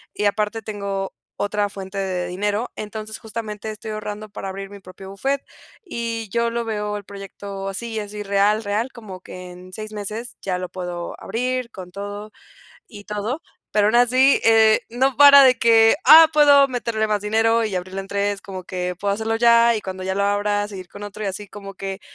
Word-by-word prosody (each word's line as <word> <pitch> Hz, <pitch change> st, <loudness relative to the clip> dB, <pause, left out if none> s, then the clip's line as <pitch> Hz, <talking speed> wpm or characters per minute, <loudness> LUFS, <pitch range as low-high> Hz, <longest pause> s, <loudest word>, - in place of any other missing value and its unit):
y 210 Hz, -, -1 dB
aparte 210 Hz, +2 st, 0 dB
tengo 200 Hz, -2 st, -4 dB, 0.2 s
otra 205 Hz, 0 st, -1 dB
fuente 195 Hz, 0 st, -8 dB
de 180 Hz, -2 st, -2 dB
dinero, 205 Hz, +5 st, -2 dB
entonces, 215 Hz, +1 st, -7 dB
justamente 220 Hz, -1 st, -6 dB
estoy 215 Hz, 0 st, -7 dB
ahorrando 215 Hz, 0 st, -6 dB
para 195 Hz, -1 st, -6 dB
abrir 195 Hz, +1 st, -7 dB
mi 200 Hz, -, -10 dB
propio 190 Hz, +1 st, -12 dB
buffet, 270 Hz, +8 st, -2 dB, 0.4 s
y 230 Hz, -, -4 dB
yo 235 Hz, 0 st, +1 dB
lo 235 Hz, 0 st, -3 dB
veo 210 Hz, -1 st, -3 dB
el 205 Hz, -, -8 dB
proyecto 195 Hz, 0 st, -8 dB
así, 220 Hz, +3 st, -4 dB
es 205 Hz, 0 st, -7 dB
irreal, 205 Hz, +1 st, +1 dB
real, 210 Hz, +5 st, -1 dB
como 205 Hz, -6 st, -10 dB
que 180 Hz, -1 st, -10 dB
en 180 Hz, +1 st, -13 dB
6 215 Hz, +1 st, -7 dB
meses 215 Hz, +3 st, -6 dB
ya 185 Hz, -2 st, -2 dB
lo 180 Hz, 0 st, -5 dB
puedo 175 Hz, -2 st, -5 dB
abrir 255 Hz, +1 st, -2 dB
con 180 Hz, -4 st, -10 dB
todo 205 Hz, +2 st, -7 dB, 0.6 s
y 205 Hz, -3 st, -12 dB
todo, 210 Hz, +9 st, -4 dB, 0.3 s
pero 210 Hz, -1 st, +3 dB
aún 215 Hz, -, +2 dB
así, 255 Hz, +3 st, +5 dB
eh, 220 Hz, -1 st, +5 dB
no 255 Hz, +2 st, +1 dB
para 280 Hz, -1 st, +9 dB
de 255 Hz, -2 st, +6 dB
que, 225 Hz, -1 st, +5 dB
ah, 320 Hz, +1 st, +10 dB
puedo 285 Hz, -2 st, +6 dB
meterle 230 Hz, -4 st, -2 dB
más 210 Hz, -1 st, 0 dB
dinero 225 Hz, +2 st, +2 dB
y 205 Hz, -3 st, -2 dB
abrirlo 185 Hz, +2 st, -4 dB
en 195 Hz, -, -10 dB
3 200 Hz, 0 st, -1 dB
como 185 Hz, -2 st, -8 dB
que 180 Hz, -1 st, -4 dB
puedo 200 Hz, 0 st, 0 dB
hacerlo 225 Hz, +1 st, -1 dB
ya, 235 Hz, 0 st, +5 dB
y 215 Hz, -, -3 dB
cuando 185 Hz, -1 st, -6 dB
ya 190 Hz, +1 st, -2 dB
lo 200 Hz, -, +1 dB
abra, 205 Hz, 0 st, 0 dB
seguir 185 Hz, -3 st, -9 dB
con 205 Hz, -, -9 dB
otro, 205 Hz, +1 st, -8 dB
y -, -, -2 dB
así 200 Hz, +2 st, -6 dB
como 200 Hz, 0 st, -10 dB
que, 195 Hz, +1 st, -6 dB
210 Hz, 200 wpm, -22 LUFS, 195-225 Hz, 0.6 s, ah